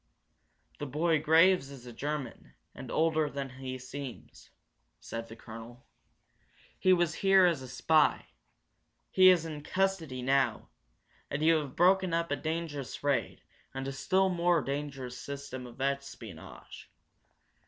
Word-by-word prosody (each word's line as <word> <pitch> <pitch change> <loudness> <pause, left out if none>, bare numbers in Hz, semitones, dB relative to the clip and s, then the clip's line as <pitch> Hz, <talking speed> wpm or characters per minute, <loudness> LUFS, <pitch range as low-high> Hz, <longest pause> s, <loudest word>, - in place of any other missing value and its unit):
"The 145 - -4
boy 155 +3 +1
Graves 165 0 +4
is 135 -3 -11
a 120 - -9
German, 145 +1 -5 0.2
and - - -9
older 160 -1 +1
than 140 -2 -5
he 130 -1 -4
seems," 130 0 -9 0.5
said 115 0 -6
the 115 - -10
colonel. 115 +2 -11 0.9
"He 185 - +4
was 175 -3 +3
here 195 -1 +6
as 170 -6 +2
a 130 - -8
spy. 150 +4 +2 0.9
He 185 0 +7
is 175 -3 +4
in 155 -2 -6
custody 165 -7 -1
now, 135 -3 +1 0.6
and 145 +2 -2
you 165 0 +5
have 145 -4 -5
broken 185 0 +3
up 170 -2 -1
a - - +2
dangerous 155 -5 -4
raid 145 -2 -1 0.3
and 135 0 -4
a - - -2
still 190 +8 +1
more 175 -3 +2
dangerous 135 -2 -5
system 140 -3 -7
of 120 +2 -14
espionage. 135 -10 -6
145 Hz, 140 wpm, -30 LUFS, 130-165 Hz, 0.9 s, He